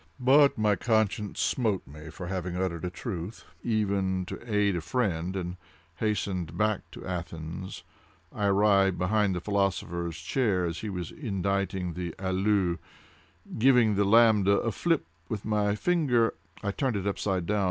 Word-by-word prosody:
But 140 +3 +5
my 105 -1 +3
conscience 110 -2 0
smote 110 -7 0
me 75 +3 -11
for 90 +3 -8
having 90 -1 -3
uttered 90 -2 -2
a - - -1
truth, 90 +1 -6 0.2
even 100 -4 0
to 120 +5 -8
aid 105 -2 +2
a 85 - -2
friend, 95 -4 -1
and 90 -1 -4 0.4
hastening 100 -3 -1
back 105 +5 -1
to - - -9
Athens, 85 0 -6 0.5
I 105 - 0
arrived 100 -1 +4
behind 100 +1 +1
the - - -1
philosopher's 85 -4 -1
chair 95 +1 0
as 85 0 -3
he 110 - -4
was 90 -3 -4
inditing 100 - -2
the 90 -1 -4
'αυλος.' 95 -2 +1 0.8
"Giving 120 -3 +5
the 100 0 +2
lambda 105 -2 +5
a 115 - -1
fillip 165 - 0 0.2
with 105 -3 -4
my 105 -1 +1
finger, 130 -5 +2 0.3
I 100 - 0
turned 130 +2 -1
it 100 -1 -2
upside 95 -3 -1
down. 105 +3 0
100 Hz, 150 wpm, -28 LUFS, 90-110 Hz, 0.8 s, But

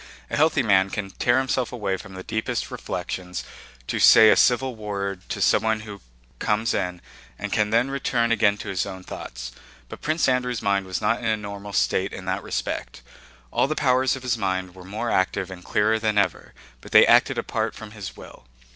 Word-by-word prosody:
A - - 0
healthy 150 -2 +3
man 95 -3 +3
can 100 -1 -4
tear 120 +6 +2
himself 130 -2 0
away 105 -6 -2
from 95 0 -10
the 95 - -7
deepest 110 +2 -3
reflections 90 -1 -5 0.4
to - - -2
say 110 -1 +8
a - - +6
civil 125 0 +3
word 100 -3 -4
to - - -3
someone 110 0 +2
who 105 -2 -9 0.4
comes 110 +1 0
in 90 -1 -2 0.4
and - - -4
can 105 -1 +2
then 120 +5 +2
return 120 -4 0
again 105 -2 +3
to - - -7
his 95 0 -1
own 95 -1 -8
thoughts. - - -7 0.4
But - - -9
Prince 155 +2 +1
Andrew's 125 -3 0
mind 100 -2 +1
was 95 +2 -3
not 110 +2 +1
in 115 - -7
a 110 -1 +2
normal 100 -1 -7
state 95 0 +1
in 95 - -7
that 95 +2 -1
respect. - - -4 0.5
All - - +2
the 155 - -2
powers 130 -2 +2
of 130 - -9
his 120 -2 -1
mind 95 -2 -2
were 90 -1 -12
more 110 +5 -3
active 95 0 0
and 90 -1 -9
clearer 110 +4 +1
than 110 -1 0
ever, 100 - 0 0.3
but - - -13
they - - +9
acted - - +4
apart - - -2
from 110 -1 -10
his 105 -3 -8
will. - - -13
105 Hz, 200 wpm, -24 LUFS, 95-115 Hz, 0.5 s, they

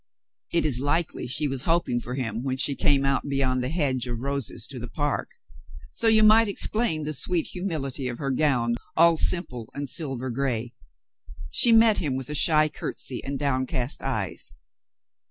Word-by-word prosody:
It 170 - +1
is 130 -5 +3
likely 145 +3 -1
she 130 +5 +1
was 135 -2 -3
hoping 165 -7 +1
for 125 +1 -6
him 115 -4 -3
when 130 0 -3
she 140 +1 +2
came 140 -2 +2
out 140 +1 0
beyond 130 -2 0
the 125 - -1
hedge 135 -6 0
of 120 -1 -4
roses 140 -4 -2
to 130 - -5
the 120 0 -7
park. 145 -1 -2 0.6
So 230 - 0
you 220 -1 +5
might 220 +1 +6
explain 200 -4 -1
the 155 +1 -3
sweet 165 +5 0
humility 150 -8 -3
of 120 -1 -5
her 135 0 -3
gown, 125 -5 +1 0.2
all 170 +1 +6
simple 125 -11 0
and 140 0 -4
silver 130 -4 0
gray. 120 -2 -2 0.8
She 235 - +6
met 225 -1 +5
him 145 -6 -2
with 130 +2 -5
a - - -3
shy 155 +1 +4
curtsy 135 -3 -4
and 140 0 -4
downcast 130 -2 -1
eyes. - - -1
140 Hz, 175 wpm, -25 LUFS, 125-160 Hz, 0.8 s, might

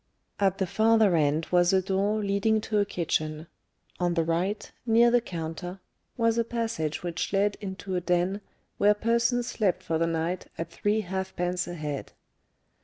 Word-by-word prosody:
At 195 -1 +2
the 190 - 0
farther 220 0 +4
end 155 +1 +2
was 175 0 +4
a 190 - +5
door 200 +3 0
leading 200 +2 +2
to 215 -1 0
a 205 - +3
kitchen; 155 -4 -2 0.5
on 175 -1 +1
the 165 - +2
right, 175 +6 -1
near 235 0 +5
the 245 0 +4
counter, 175 0 -6 0.4
was 230 -1 +2
a - - +3
passage 225 -11 -2
which 170 -2 -3
led 200 +1 +2
into 190 -1 -5
a 180 - 0
den 180 +3 0 0.4
where 210 +1 +5
persons 235 +3 +1
slept 215 -6 0
for 160 -1 -1
the 165 - +2
night 165 +2 -2
at 165 0 -5
three 205 +5 0
halfpence 180 -2 -2
a 175 - -5
head. 150 -3 -5
190 Hz, 170 wpm, -27 LUFS, 170-215 Hz, 0.5 s, a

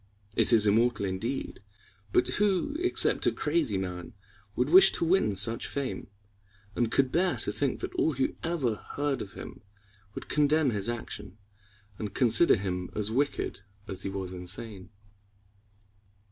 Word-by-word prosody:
It - - +5
is 110 -3 +5
immortal 110 0 +2
indeed, 110 +6 -4 0.5
but - - +2
who 205 - 0
except 365 +1 +3
a - - +4
crazy 150 - 0
man 95 +5 -6 0.4
would 125 - 0
wish 190 +4 +7
to - - -1
win 160 - +2
such 115 +4 +3
fame, 140 -2 -5 0.7
and 120 -1 0
could 135 -2 +1
bear 180 +2 +1
to - - 0
think 125 +6 -2
that - - -5
all 160 - +1
who 130 0 -1
ever 145 -10 -1 0.2
heard 145 -1 -1
of 100 - -8
him - - -10 0.5
would - - -7
condemn 150 -1 +2
his 105 0 -2
action, 115 -4 -7 0.6
and 105 -2 -6
consider 125 +7 +5
him 90 -3 -4
as 105 0 -2
wicked 140 -4 -2 0.3
as 95 -1 -6
he 95 - -3
was 95 -1 -5
insane? 95 +2 -6
120 Hz, 150 wpm, -28 LUFS, 100-145 Hz, 0.7 s, wish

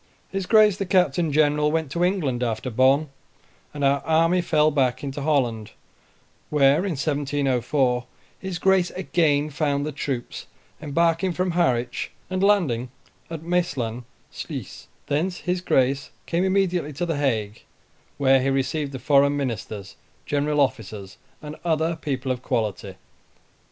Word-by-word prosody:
His 195 -1 -3
Grace 215 -2 +5
the 195 - -2
Captain 175 -3 +2
General 150 0 +2
went 160 -3 -1
to 170 +3 0
England 160 -10 0
after 120 +1 -2
Bonn, 135 +6 +3 0.6
and 145 - -5
our 140 0 +3
army 165 +3 +2
fell 155 -3 +2
back 130 -3 0
into 140 0 -4
Holland, 125 -8 0 0.8
where, 140 -1 +4
in 185 - -1
April 145 +1 0
1704, 135 -3 0 0.3
his 190 -2 -4
Grace 190 -1 +3
again 155 -5 +1
found 145 -1 0
the 155 - -3
troops, 135 -3 -5 0.3
embarking 165 +4 +1
from 180 +1 -1
Harwich 125 -8 0 0.2
and 185 0 -1
landing 165 - +2 0.4
at 165 -1 -6
Maesland 140 -10 -1 0.3
Sluys: - - -7 0.2
thence 175 +6 -1
his 180 0 -1
Grace 135 -5 +1 0.2
came 170 +2 0
immediately 185 -5 0
to 160 +6 -2
the 165 -3 -2
Hague, 110 -7 -1 0.6
where 135 -1 +4
he 135 - +1
received 140 +2 -1
the - - -4
foreign 140 +1 +3
ministers, 110 -7 -5 0.3
general 145 +1 0
officers, 110 -8 -2 0.3
and 150 0 -7
other 165 0 0
people 135 -4 -3
of 125 -1 -3
quality. 110 -6 -2
145 Hz, 140 wpm, -24 LUFS, 130-170 Hz, 0.8 s, Grace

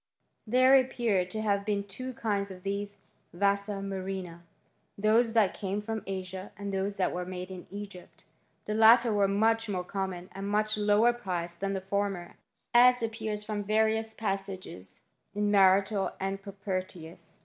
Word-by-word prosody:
There 255 +3 +5
appear 235 -7 +2
to 215 +4 -4
have 200 -2 +1
been 205 -1 -1
two 255 +6 -7
kinds 200 -3 -1
of 185 -1 -10
these 200 +1 -3 0.4
vasa 200 +2 0
murrhina; 190 -3 -5 0.6
those 220 +3 +3
that 220 -4 +4
came 200 0 -3
from 220 +1 -4
Asia, 190 0 -5
and 200 -1 -5
those 195 +1 -2
that 185 -2 +1
were 180 - -2
made 185 +1 -6
in 185 -1 -9
Egypt. 200 -2 -10 0.4
The 210 - -2
latter 225 +1 +6
were 200 -1 +3
much 225 +3 +2
more 185 -3 -2
common, 185 -1 -4
and 195 +1 -5
much 215 +1 +1
lower 210 +3 +4
priced 175 -7 -4
than 195 0 -1
the 190 - -2
former, 195 -2 -2 0.4
as 245 0 +6
appears 220 -2 -3
from 210 -1 -3
various 220 +1 +1
passages 195 - -5 0.3
in 205 0 +1
Martial 195 0 +4
and 195 +1 -3
Pro 200 0 -9
pertius. 185 -4 -6
200 Hz, 160 wpm, -29 LUFS, 190-215 Hz, 0.6 s, latter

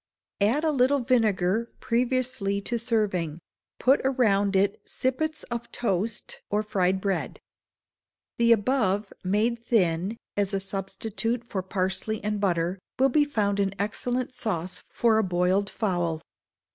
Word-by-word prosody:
Add 235 +10 +3
a 315 - +3
little 270 0 +3
vinegar 225 -3 +2
previously 240 -4 0
to 235 +3 -2
serving; 200 -9 0 0.4
put 265 +3 +4
around 205 -7 +2
it 195 +1 +2
sippets 310 +5 -2
of 235 0 -4
toast 210 -1 -2
or 210 +1 +1
fried 190 -3 +1
bread. 195 0 -2 1.0
The 235 0 +5
above, 215 -3 +2
made 220 +5 +1
thin, 190 -2 +1 0.2
as 200 -1 +1
a - - +1
substitute 210 +4 -3
for 205 -5 -3
parsley 190 +3 -2
and 210 0 -1
butter, 180 -1 0 0.2
will 270 +1 +4
be 295 +3 +4
found 205 -8 0
an 195 -1 0
excellent 245 +5 -2
sauce 180 -6 -3
for 225 -2 +1
a - - +2
boiled 185 +2 +1
fowl. 175 -6 -1
210 Hz, 135 wpm, -26 LUFS, 190-235 Hz, 1.0 s, The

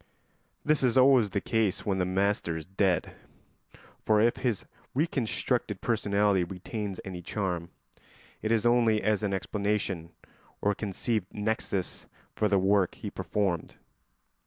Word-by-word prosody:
This 155 0 +3
is 130 -1 +2
always 130 -4 +6
the 100 - -1
case 110 -2 0
when 95 -2 0
the 90 - +2
master 95 -3 0
is 80 - -7
dead; 95 0 0 0.9
for 110 -1 +4
if 115 +2 +3
his 120 -6 -1 0.3
reconstructed 135 - 0
personality 100 -4 +2
retains 100 +2 -5
any 90 -2 -6
charm, 90 -2 -3 0.7
it 110 - -1
is 115 0 +2
only 115 -3 +4
as 105 -1 +2
an 105 -2 -1
explanation 100 -3 -1 0.5
or 105 - +2
conceived 105 0 -2
nexus 105 -3 -2 0.3
for 110 - +2
the 100 -1 +3
work 95 0 +2
he - - -6
performed. 95 -6 -2
105 Hz, 135 wpm, -29 LUFS, 95-110 Hz, 0.9 s, always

